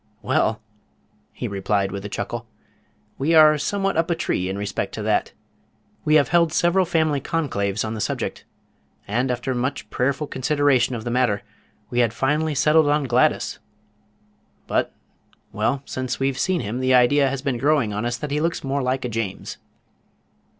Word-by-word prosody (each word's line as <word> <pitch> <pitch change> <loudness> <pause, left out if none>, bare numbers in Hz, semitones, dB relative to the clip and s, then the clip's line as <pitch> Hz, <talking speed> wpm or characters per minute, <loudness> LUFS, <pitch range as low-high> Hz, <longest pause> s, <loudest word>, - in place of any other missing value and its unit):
"Well," 110 0 +1 0.7
he - - -5
replied 100 0 -1
with 100 0 -5
a 105 - -5
chuckle, 115 +2 -4 0.7
"we 155 +5 +2
are 155 -1 +7
somewhat 195 +3 -1
up 165 +1 +1
a 170 - +2
tree 90 - -1
in 95 - -3
respect 100 0 -3
to - - -5
that. - - +1 0.7
We 155 - +4
have 145 -2 +4
held 170 -1 +3
several 175 +3 +2
family 155 -4 +1
conclaves 110 - -1
on 110 - -3
the 110 - -4
subject, - - -3 0.6
and 120 +5 0
after 125 +2 -2
much 130 +3 -2
prayerful 135 +4 0
consideration 135 -2 +1
of 110 - -5
the 120 - -3
matter 120 -5 +1 0.5
we 120 - 0
had 115 -2 +2
finally 150 +4 0
settled 155 +2 +4
on 145 0 +2
Gladys, 125 -1 +1 1.1
but - - 0 0.6
well, 135 +2 0
since 130 0 -4
we've 135 -1 0
seen 185 -2 +1
him 110 +5 -4
the 130 0 +3
idea 135 +3 +4
has 135 0 -4
been 135 -4 -1
growing 140 -6 +2
on 105 +2 -2
us 120 0 -1
that 150 +2 -5
he 150 +1 0
looks 165 +1 -1
more 140 +1 -1
like 130 0 -1
a - - 0
James." 115 -4 -4
130 Hz, 170 wpm, -23 LUFS, 115-150 Hz, 1.1 s, are